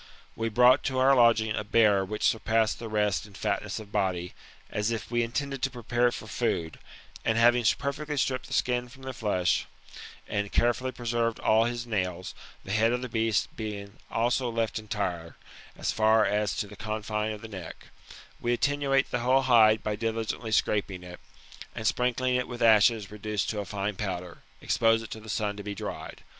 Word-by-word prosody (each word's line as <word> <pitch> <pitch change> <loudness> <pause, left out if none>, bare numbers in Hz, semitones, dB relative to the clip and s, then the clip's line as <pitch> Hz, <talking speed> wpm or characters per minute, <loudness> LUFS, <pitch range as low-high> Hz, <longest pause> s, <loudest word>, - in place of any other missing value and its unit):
We 115 0 -1
brought 125 +3 +5
to 130 -1 -1
our 135 +1 +5
lodfring 110 -3 +4
a - - -2
bear 105 -2 +4
which 105 +2 -5
surpassed 110 0 +2
(he 115 - -6
rest 105 -1 0
in 100 - -16
fatness 105 -1 -2
of 105 -2 -9
body, 90 -4 -1 0.4
as 105 +1 -1
if 115 0 -4
we 120 0 +2
in 115 0 -2
tended 140 0 -3
to 135 - +1
prepare 120 -1 0
it 120 - 0
for - - -8
food, 90 -8 -2 0.4
and 110 - +1
having 120 +1 +5
perfectly 145 +2 -3
stripped 130 -1 -1
the - - -7
skin 125 -1 0
from 130 +3 -15
the 130 0 -5
flesh, 100 -6 0 0.6
and 100 -1 -2
carefully 120 +2 +1
preserved 120 -2 -1
all 110 +1 +4
his 120 0 -3
nails, 95 -5 -3 0.3
the 95 - -7
head 110 +3 +3
of 125 +1 -2
the 125 - -5
beast 110 -1 0
being 100 -2 -6
also 120 +2 +1
left 115 -1 -1
entire, 90 -6 -4 0.4
so - - -1
far 110 0 +4
as 105 0 0
to - - -2
the 105 +1 -12
confine 110 +1 -3
of 105 -1 -7
the - - -6
neck; 95 -6 -9 0.5
we 120 0 0
attenuate 140 +1 +1
the 120 - 0
whole 130 +3 +3
hide 110 -4 +5
by 105 -1 -1
diligently 115 0 -3
scraping 100 -3 0
it, 90 0 -10 0.6
and 110 - -5
sprinkling 125 +2 +1
it 125 0 0
with 120 -1 -4
ashes 110 -1 +5
reduced 105 -1 -2
to 105 - -4
a 100 - -3
fine 100 0 -3
powder, 90 -3 -5 0.2
expose 115 0 +2
it 110 - -10
to 110 - -6
the 110 0 -12
sun 105 -1 -1
to 100 - -7
be 100 0 -5
dried. - - -7
110 Hz, 195 wpm, -28 LUFS, 105-120 Hz, 0.6 s, brought